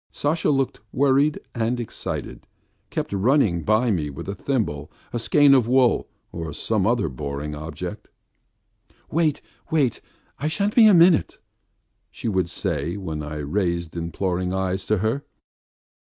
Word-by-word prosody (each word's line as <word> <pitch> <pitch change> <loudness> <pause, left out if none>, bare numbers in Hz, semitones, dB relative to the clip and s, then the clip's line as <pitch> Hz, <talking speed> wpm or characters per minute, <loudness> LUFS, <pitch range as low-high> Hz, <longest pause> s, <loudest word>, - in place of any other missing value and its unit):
Sasha, 160 +3 0
looking 135 -6 0
worried 140 +2 +3
and 120 +1 -1
excited, 120 - -5 0.4
kept - - -3
running 100 - +2
by 110 +5 +2
me 80 -7 -1
with 70 - -8
a 100 - -2
thimble, 90 - -2 0.2
a 120 - -1
skein 145 +4 +5
of 125 -4 +4
wool 125 -1 +3 0.2
or 80 -3 -5
some 105 +5 0
other 115 -6 +2
boring 70 +2 -5
object. 80 +6 -6 1.0
"Wait, 155 -2 +1 0.3
wait, 145 -7 +1 0.4
I 145 - -1
shan't 200 +6 0
be 225 -3 +7
a 205 - +7
minute," 170 - +5 0.7
she - - -6
would 95 -5 0
say 85 -2 -2
when 80 -6 -4
I 75 +1 -6
raised 85 +2 -2
imploring 90 +2 -2
eyes 95 0 -2
to 110 - +2
her. 110 +8 -1
105 Hz, 140 wpm, -23 LUFS, 85-135 Hz, 1.0 s, be